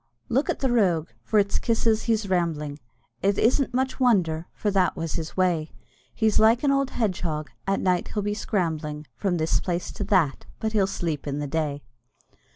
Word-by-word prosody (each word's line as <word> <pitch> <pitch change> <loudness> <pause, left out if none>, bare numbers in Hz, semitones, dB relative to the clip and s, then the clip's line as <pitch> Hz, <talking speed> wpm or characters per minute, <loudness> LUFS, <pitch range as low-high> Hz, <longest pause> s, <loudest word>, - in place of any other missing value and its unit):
i.e. 120 0 -47
"Look 270 +5 +2
at - - -1
the 265 -2 +1
rogue, 180 -9 +2 0.2
its 205 -2 +3
for - - -4
kisses 225 -2 +2
he's 220 -3 +1
rambling, 160 -5 -1 0.4
It 200 0 +2
isn't 255 +4 +2
much 260 +2 -1
wonder, 175 -10 +2
for 210 - -2
that 190 -2 +2
was 165 -1 -3
his 160 +2 -5
way; 175 -4 +1 0.4
He's 220 -2 +2
like 225 +4 +5
an 280 - +4
old 275 -1 +2
hedgehog, 175 - -2 0.2
at 195 0 +1
night 180 -2 +1
he'll 210 - -3
be 205 0 -1
scrambling 160 -8 -2
From 190 -4 0
this 160 0 +1
place 175 -1 -3
to - - -5
that, 185 -9 +1
but 220 - -1
he'll 205 -3 +2
sleep 165 -7 -3
in 140 0 -2
the 145 - -2
day." 145 -1 -2
185 Hz, 190 wpm, -25 LUFS, 160-220 Hz, 0.4 s, like